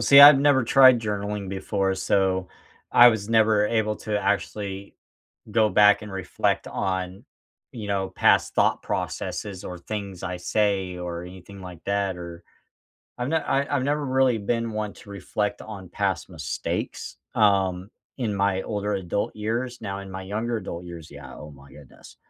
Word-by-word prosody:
See, 140 0 +8
I've 145 0 +11
never 140 -2 +4
tried 130 0 +6
journaling 105 -2 -3
before, 95 0 -1
so 95 -1 0 0.4
I 120 0 +8
was 110 -2 -1
never 110 -2 +4
able 105 -1 0
to 105 -1 -2
actually 100 -1 -3 0.6
go 110 -1 +3
back 105 0 +5
and 105 -2 -8
reflect 95 -2 -1
on, 95 0 -3 0.5
you 110 -4 -7
know, 95 -1 -1
past - - +2
thought - - +2
processes 100 -3 -4
or 90 - -6
things 100 0 -6
I 90 -1 -3
say 95 -1 0
or 85 -1 -5
anything 95 +2 -11
like 90 -3 -10
that, 100 -2 -1
or 85 0 -9 0.8
I've 125 +5 -2
n - - +2
I 140 -3 0
I've 130 -2 0
never 145 +1 0
really 130 -3 +2
been 115 +2 -2
one 105 -1 -3
to 100 - -15
reflect 105 +1 -3
on 100 -4 -9
past 95 -1 -2
mistakes, 80 -7 -4 0.2
um, 95 -3 +2 0.3
in 115 -6 -2
my 100 -1 +1
older 105 -1 -2
adult 95 +3 -3
years, 120 +3 -3
now 100 -2 -5
in 100 -1 -10
my 95 0 -6
younger 110 +4 -2
adult 90 -4 -6
years, 85 -2 -9
yeah, 70 -2 -11
oh 75 0 -10
my 70 0 -16
goodness, 70 -3 -15
100 Hz, 165 wpm, -25 LUFS, 95-110 Hz, 0.8 s, I've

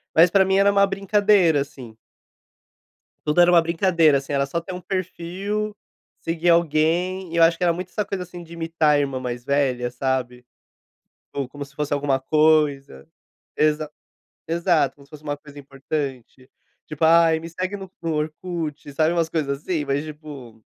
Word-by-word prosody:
mas 165 +2 +7
pra 195 0 +4
mim 190 0 +2
era 200 +1 +5
uma 200 0 +4
brincadeira, 195 -5 +3
assim. 130 -6 -9 1.3
Tudo 150 +4 +3
era 175 - +6
uma 170 -2 +6
brincadeira, 165 -3 +3
assim, 140 +1 -5
era 140 0 +2
só 170 +5 -3
ter 180 +2 -8
um 180 - -7
perfil, 195 +3 -3 0.5
seguir 165 +1 0
alguém, 170 +3 +1
e - - -3
eu 165 - +4
acho 165 0 +5
que 180 - -2
era 170 - +4
muito 180 +2 -6
essa 210 +2 -2
coisa, 195 -2 -4
assim, 180 -1 -9
de 165 - -15
imitar 165 -2 +1
a - - +2
irmã 135 -2 -1
mais 120 0 -5
velha, 130 -4 0
sabe, 125 -1 -3 0.9
ou 140 -3 -3
como 145 0 -7
se 140 0 -19
fosse 150 0 -3
alguma 140 -2 +1
coisa. 150 - +2 0.5
Exa 150 0 +1 0.6
exato, 170 -2 +1
como 140 -1 -18
se - - -33
fosse 150 -1 -12
uma 145 -1 -3
coisa 145 0 -14
importante, 135 -2 -6 0.4
tipo 155 +1 -2
"Ai, 165 0 +5
me 165 +1 -8
segue 185 +4 -4
no 195 -1 -9
Orkut.", 155 -1 -4
sabe, 160 +3 +2
umas 165 -2 0
coisas 140 -4 -2
assim, 160 -5 -2
mas, 140 +2 -1
tipo 145 -8 -11
155 Hz, 175 wpm, -22 LUFS, 140-175 Hz, 1.3 s, mas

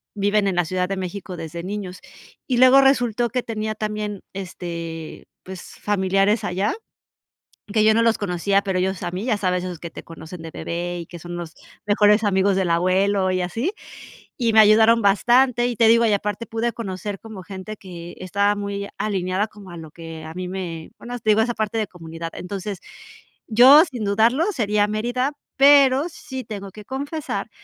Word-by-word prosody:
viven 205 0 +1
en 190 - 0
la 175 - +2
Ciudad 180 +2 -1
de 195 - -1
México 185 0 -6
desde 165 +1 -6
niños 190 -1 -5 0.5
y 250 - 0
luego 255 +2 +7
resultó 245 -3 +2
que 250 - 0
tenía 215 -2 -3
también, 210 -1 -4
este, 170 -4 -7 0.2
pues, 185 -1 -9 0.2
familiares 195 +2 +1
allá, 195 +1 -1 1.0
que 215 0 +3
yo 220 - +6
no 230 - +3
los 230 -1 +3
conocía 195 +1 0
pero, 190 -2 -1
ellos 190 0 -1
a - - -2
mí 185 +4 -4
ya 235 -4 +2
sabes 180 -3 0
esos 180 -2 -5
que 170 - -8
te - - -10
conocen 165 +1 -10
de 165 - -7
bebé 175 +2 -4
y 170 - -8
que 175 - -10
son 175 +1 -7
los 170 -2 -6 0.3
mejores 210 +1 +4
amigos 195 -1 +2
del 190 -2 0
abuelo 185 +3 +2
y 185 0 0
así, 225 - -2 0.7
y 235 -3 +1
me 220 - +8
ayudaron 220 +2 +6
bastante. 240 +5 +3
Y 240 - -4
te 230 - +4
digo, 230 +1 +5
y 215 - +2
aparte 210 +3 -3
pude 230 +1 -2
conocer 200 -2 -5
como 220 -4 -9
gente 195 +2 -8
que 175 -3 -10
estaba 200 +3 +1
muy 200 0 -4
alineada 195 0 -1
como 205 -3 -14
a 175 - -9
lo 160 -1 -10
que 165 -1 -9
a 160 - -8
mí 180 0 -5
me 175 -4 -6
bueno, 245 +1 -6
te 220 - -7
digo, 215 +1 +4
esa 240 +1 -1
parte 215 0 -2
de 215 - 0
comunidad. 165 -1 -8
Entonces, 195 +1 -5 0.7
yo 260 +8 +8
sin 245 -8 -5
dudarlo 225 - +2
sería 210 - +1
Mérida, 240 +6 -1 0.2
pero, 275 +1 +6
sí 265 -4 -7
tengo 200 -3 -7
que 210 +1 -11
confesar 285 +3 -4
200 Hz, 190 wpm, -22 LUFS, 180-225 Hz, 1.0 s, me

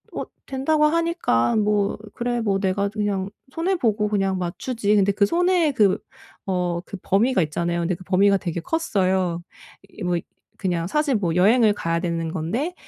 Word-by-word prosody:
어 - - -2 0.2
된다고 300 +3 +1
하니까 330 - +1
'뭐 210 -1 +1 0.2
그래. 240 0 -2
뭐 200 -3 +1
내가 200 +1 0
그냥 200 -2 -2 0.2
손해 345 +6 0
보고 215 - +1
그냥 195 -2 0
맞추지.' 205 +4 -1
근데 200 -1 +4
그 200 +1 +2
손해의 345 - +2
그 210 -7 +3 0.5
어 180 -2 -1
그 195 - -7
범위가 225 +3 +2
있잖아요. 170 +3 -2
근데 170 +2 0
그 185 - -13
범위가 195 +2 +4
되게 170 -3 -4
컸어요. 185 - 0 0.5
이 210 - -10
뭐 180 -1 +1
이 - - -5 0.4
그냥 175 -4 -1
사실 300 +5 +1
뭐 175 -6 0
여행을 215 +4 +5
가야 170 -4 -1
되는 165 -2 -2
건데 215 - -2
200 Hz, 315 characters per minute, -23 LUFS, 180-245 Hz, 0.5 s, 여행을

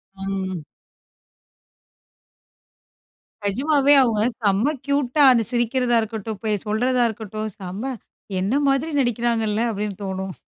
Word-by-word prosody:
ம். 190 -3 -4 2.8
நிஜமாவே 280 +7 +3
அவங்க 230 -5 +2 0.2
செம 210 +6 +2
க்யூட்டா 285 0 +2
அந்த 235 -2 +3
சிரிக்கிறதா 240 0 +1
இருக்கட்டும், 220 -1 -5
போய் 210 -3 -1
சொல்றதா 245 +3 +2
இருக்கட்டும், 215 0 -5
செம, 190 +3 -6 0.6
"என்ன 195 +5 0
மாதிரி 275 +4 +1
நடிக்கிறாங்கல்ல!" 235 -2 0
அப்பிடீன்னு 210 -2 -4
தோணும். 190 0 -4
220 Hz, 95 wpm, -22 LUFS, 200-250 Hz, 2.8 s, நிஜமாவே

